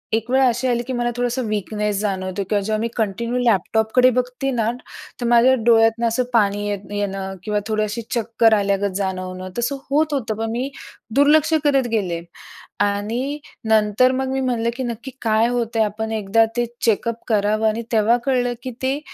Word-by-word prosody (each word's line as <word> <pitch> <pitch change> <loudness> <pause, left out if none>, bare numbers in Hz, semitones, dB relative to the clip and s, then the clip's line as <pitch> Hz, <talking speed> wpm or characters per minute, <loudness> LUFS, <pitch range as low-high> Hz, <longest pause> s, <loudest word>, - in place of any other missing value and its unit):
एक 225 +2 -3
वेळ 265 +1 +4
अशी 245 +2 0
आली, 240 -1 0
की 260 - -3
मला 240 0 0
थोडंसं 245 0 -1
वीकनेस 210 -1 -2
जाणवतो 190 -1 -2
किंवा 205 -1 +1
जेव्हा 215 +2 -1
मी 230 - 0
कंटिन्यू 235 +3 -1
लॅपटॉपकडे 220 +3 +3
बघते 250 +2 -1
ना, 230 -3 0 0.5
तर - - -1
माझ्या 240 +2 +5
डोळ्यातनं 225 0 +4
असं 230 +3 +1
पाणी 205 -2 +2
येत 205 -1 -2
येणं 195 -1 -3
किंवा 210 -1 0
थोडी 215 -1 0
अशी 215 +2 -3
चक्कर 230 -1 +2
आल्यागत 200 -1 +1
जाणवणं, 185 -1 -4
तसं 255 +4 -1
होत 300 +2 +2
होतं, 225 -6 -2
पण 225 0 -2
मी 250 +4 -2 0.5
दुर्लक्ष 300 +3 +4
करत 275 -4 +2
गेले. 180 -6 -1 0.6
आणि 220 +8 -1 0.3
नंतर 220 +3 +4
मग 265 0 -1
मी 265 - -1
म्हणलं, 235 -3 0
की 260 - -3
नक्की 240 +2 -5
काय 220 0 +2
होत 235 -1 -2
आहे 220 - +4
आपण 220 +2 -4
एकदा 220 +1 +2
ते 240 - +2 0.2
चेकअप 230 +1 0
करावं. 215 0 +2
आणि 220 +2 -1
तेव्हा 225 +2 +3
कळलं, 250 -2 +1
की 255 - -4
ते 265 +2 0
225 Hz, 180 wpm, -21 LUFS, 210-245 Hz, 0.6 s, माझ्या